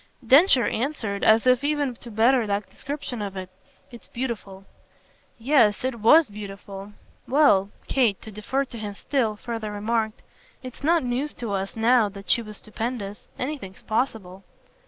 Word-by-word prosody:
Densher 270 +1 +6
answered 225 -6 -2
as 220 +2 +5
if 255 +1 +4
even 290 -3 0
to 240 - -11
better 230 +2 +3
that 200 0 -1
description 275 -4 -6
of 195 -2 -5
it. 185 0 -7 0.4
"It's 235 - -13
beautiful." 210 -6 -5 0.7
"Yes 235 -4 +3
it 260 -3 -2
WAS 305 +8 +6
beautiful. 200 -1 -9 0.3
Well," 255 -9 +4 0.2
Kate, 235 -7 +2
to 220 - -9
defer 260 +7 -2
to 235 -3 -10
him 205 -2 -5
still, 230 -3 -1
further 225 -1 -5
remarked, 220 +2 -2 0.4
"it's 255 +1 -9
not 330 +1 +3
news 255 +4 -2
to 235 -4 -5
us 195 0 -3
now 225 -1 +4
that 195 -2 -4
she 235 - +4
was 215 -2 -9
stupendous. 215 -2 -5
Anything's 255 -9 -5
possible." 215 -5 -2
225 Hz, 155 wpm, -24 LUFS, 205-255 Hz, 0.7 s, Densher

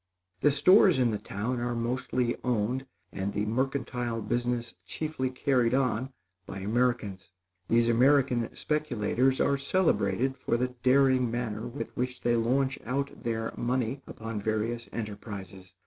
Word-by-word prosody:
The 145 - +4
stores 185 +4 +6
in 125 -3 +3
the 105 - -2
town 110 +5 -3
are 120 0 -2
mostly 125 +1 -1
owned, 125 +2 0 0.2
and 95 +1 -3
the 105 - -1
mercantile 125 -1 -1
business 120 +2 -2
chiefly 130 - -3
carried 125 -2 +1
on, 130 -1 0 0.4
by 100 - -6
Americans. 110 -3 -1 0.4
These 115 0 +3
American 125 0 +3
speculators 130 -3 0
are 140 -1 +2
celebrated 140 -4 +1
for 120 - 0
the 125 +1 0
daring 130 -1 +4
manner 115 -1 -3
with 125 +4 -6
which 125 0 -3
they 120 0 +2
launch 130 +4 +1
out 140 +3 -3
their 115 -2 -2
money 125 +2 -1
upon 115 -1 -5
various 110 +2 -2
enterprises. 100 -4 -7
120 Hz, 135 wpm, -29 LUFS, 115-130 Hz, 0.4 s, stores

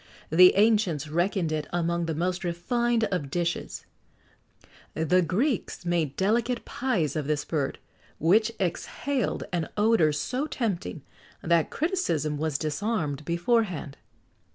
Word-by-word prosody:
The 180 +3 +7
ancients 200 -8 +3
reckoned 175 +1 0
it 155 -2 -2
among 170 0 0
the 160 - -2
most 180 +3 -1
refined 230 +7 0
of 165 -7 -2
dishes.[XX 170 +3 -3 1.1
72] 160 - -1
The 180 +3 +4
Greeks 200 - -1
made 170 -5 0
delicate 230 +5 0
pies 180 - -1
of 150 -3 -2
this 150 -1 -1
bird, 145 -4 -2 0.4
which 215 +8 +3
exhaled 245 +9 -2
an 170 -2 -1
odour 210 -7 +4
so 255 - -2
tempting, 195 - -3 0.4
that 170 -1 +2
criticism 285 - -1
was 155 -2 0
disarmed 155 -2 -2
beforehand. 170 - 0
175 Hz, 125 wpm, -27 LUFS, 155-220 Hz, 1.1 s, The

